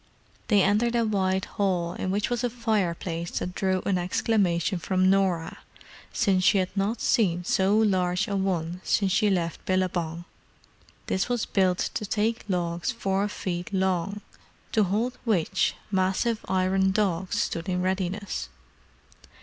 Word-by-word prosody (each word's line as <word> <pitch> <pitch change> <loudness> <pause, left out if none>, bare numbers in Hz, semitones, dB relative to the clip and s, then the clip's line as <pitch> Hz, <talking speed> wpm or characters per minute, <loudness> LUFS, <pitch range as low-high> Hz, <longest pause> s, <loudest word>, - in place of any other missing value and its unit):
They 205 -4 +4
entered 225 +4 +2
a 235 -1 +2
wide 190 -3 0
hall 180 -4 -1
in 185 - -3
which 205 +5 -1
was 240 0 -1
a 245 - +1
fireplace 185 -7 -1
that 180 - -3
drew 190 -1 0
an 190 -2 +1
exclamation 180 -1 +1
from 185 +2 +2
Norah, 185 -4 0 0.5
since 195 -5 +2
she 200 - +5
had 185 0 -1
not 205 +3 0
seen 180 -7 +2
so 190 +3 +2
large 185 -2 +2
a 200 - -2
one 180 -2 -1
since 195 -2 +1
she 210 +2 +3
left 170 -4 -1
Billabong. 175 -3 -1 0.8
This 190 - -1
was 245 -2 0
built 185 -2 +2 0.2
to - - -3
take 220 +3 -1
logs 175 +3 -1
four 200 -4 -1
feet 180 -3 -4
long, 190 +1 0 0.5
to 215 -2 +3
hold 220 +7 -1
which 190 -5 +1 0.2
massive 195 +4 0
iron 190 +1 +2
dogs 190 -1 0
stood 165 -3 -2
in 180 0 0
readiness. 185 - -2
190 Hz, 145 wpm, -26 LUFS, 180-205 Hz, 0.8 s, she